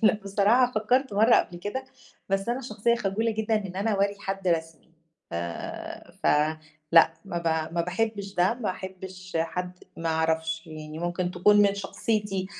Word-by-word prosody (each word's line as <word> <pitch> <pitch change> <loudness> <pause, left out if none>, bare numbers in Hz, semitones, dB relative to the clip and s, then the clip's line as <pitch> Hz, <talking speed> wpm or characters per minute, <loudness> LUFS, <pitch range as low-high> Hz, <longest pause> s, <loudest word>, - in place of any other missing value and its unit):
لأ 215 - +6
بصراحة 215 +6 +3
فكّرت 250 +5 +1
مرَّة 220 +4 +6
قبْل 175 - 0
كده، 205 +9 -4 0.4
بس 195 +2 0
أنا 245 +2 0
شخصية 235 -1 +1
خجولة 225 +1 0
جدًا 220 0 0
إن 195 -4 -2
أنا 205 +3 0
أورّي 200 0 +1
حد 195 -2 -3
رسمي، 165 -1 -2 0.4
ف - - -6 0.9
ف - - 0 0.7
لأ، 165 -1 +7
ما 175 -3 -3
ب 160 -1 -1
ما 170 - +2
باحبش 200 +2 -2
ده، 180 +5 +3
ما 240 -5 -2
احبش 185 -1 -7
حد 180 +2 -4
ما 165 0 -3
أعرفش، 160 0 0
يعني 155 0 -8
ممكن 175 +1 -1
تكون 180 +4 +4
من 200 -1 +3
شخصيتي. 200 -1 -2
195 Hz, 160 wpm, -27 LUFS, 175-215 Hz, 0.9 s, لأ